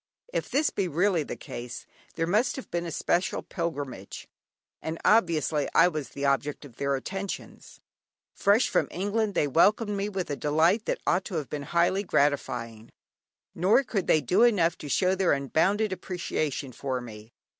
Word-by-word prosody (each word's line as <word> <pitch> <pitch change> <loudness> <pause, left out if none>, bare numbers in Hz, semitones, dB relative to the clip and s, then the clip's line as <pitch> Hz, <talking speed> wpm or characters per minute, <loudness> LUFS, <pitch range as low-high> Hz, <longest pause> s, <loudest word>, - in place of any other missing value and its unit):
If - - -2
this 290 +3 +2
be 195 - -1
really 175 +2 +2
the 145 - -5
case, 120 0 -8 0.3
there 165 - 0
must 215 +8 +1
have 265 - -8
been 170 0 -2
a - - -5
special 175 +4 0
pilgrimage, 145 - -5 0.5
and 160 +1 -4
obviously 160 -9 +3
I 180 - +7
was 155 -5 -5
the 140 - -4
object 140 +2 0
of 125 -5 -15
their 140 0 0
attentions. 195 +8 -6 0.5
Fresh 205 +5 +3
from - - +1
England, 205 +2 -1
they 150 - +3
welcomed 205 - +3
me 200 +1 -2
with 190 -6 -3
a - - -1
delight 160 +9 +2
that - - -2
ought 185 +2 +1
to 185 - -5
have 150 -4 -3
been 150 - -3
highly 175 +3 +2
gratifying; 120 - -1 0.6
nor 195 +10 +3
could 200 -7 -2
they 155 - +4
do 150 - +2
enough 200 -9 +4
to 145 - -7
show 185 +5 +2
their 190 -1 +2
unbounded 190 - +1
appreciation 155 -8 -3
of 130 -2 -1
me. 110 -1 -11
170 Hz, 170 wpm, -27 LUFS, 140-195 Hz, 0.6 s, I